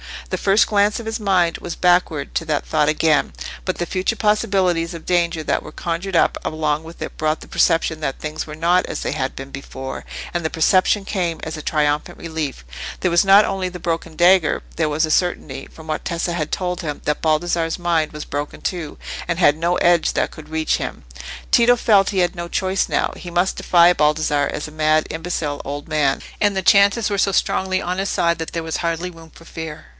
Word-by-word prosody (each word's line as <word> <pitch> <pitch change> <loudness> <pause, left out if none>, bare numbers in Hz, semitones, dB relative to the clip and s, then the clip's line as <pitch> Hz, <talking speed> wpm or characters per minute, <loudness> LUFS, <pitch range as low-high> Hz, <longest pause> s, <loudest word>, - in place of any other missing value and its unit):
The - - 0
first 200 +2 +4
glance 205 0 +2
of 230 - -8
his 225 +1 -3
mind 185 -5 +2
was 175 - -6
backward 175 -5 +1
to 165 - -1
that 150 -2 -1
thought 150 -1 +1
again, 155 0 +2 0.3
but 185 - -2
the 175 - -1
future 185 +5 -1
possibilities 195 -6 +1
of 165 -1 -9
danger 170 -2 +1
that - - 0
were 155 - -11
conjured 175 +3 -3
up - - +3
along 155 -1 -1
with 165 +1 -12
it - - -8
brought 155 0 0
the - - -12
perception 165 -2 +2
that 135 -3 -3
things 155 +1 -5
were 150 - -7
not 175 +3 +2
as - - -5
they - - -2
had 130 0 -2
been 135 +1 -8
before, 135 -1 -7 0.3
and 175 -1 -1
the 160 - 0
perception 185 +4 +3
came 175 -5 -2
as 160 0 -5
a - - -6
triumphant 150 -1 0
relief. 155 - -5 0.4
There 180 - +1
was 170 +3 +4
not 195 +2 +7
only 190 -1 -2
the 180 - -8
broken 165 -1 -3
dagger, 175 -2 +4
there 160 -1 +2
was 150 +2 0
the 155 - 0
certainty, 155 -6 -1
from 160 - -14
what 155 -1 -4
Tessa 170 0 -2
had 155 -3 -3
told 180 -1 -2
him, 150 -3 -5
that 150 - -1
Baldassarre's 165 +1 +1
mind 170 -3 0
was 150 0 -6
broken 145 +1 -5
too, 170 -5 -4 0.3
and 170 -1 -1
had 150 -4 +4
no 170 +2 +1
edge 175 -2 +3
that - - 0
could 155 -1 -12
reach 160 0 0
him. - - -6 0.5
Tito 240 +1 +6
felt 205 -5 +3
he 195 - -1
had 175 +1 +1
no 170 0 -5
choice 190 +2 0
now: - - 0
he 175 - -8
must 175 +2 0
defy 175 0 +5
Baldassarre 150 -2 +1
as 150 - -4
a - - -11
mad, 155 0 +2
imbecile 160 -3 -3
old 145 +3 -6
man; 150 -3 +1 0.2
and 205 -2 +2
the 190 - -1
chances 200 +3 +4
were 200 -1 -1
so 195 0 +2
strongly 185 0 +1
on 180 +1 -3
his 195 +1 -1
side 170 0 +1
that 160 - -5
there 165 - -2
was 160 0 -3
hardly 170 +1 -2
room 165 -1 -14
for 165 - -17
fear. 160 -2 -8
170 Hz, 220 wpm, -20 LUFS, 155-185 Hz, 0.5 s, not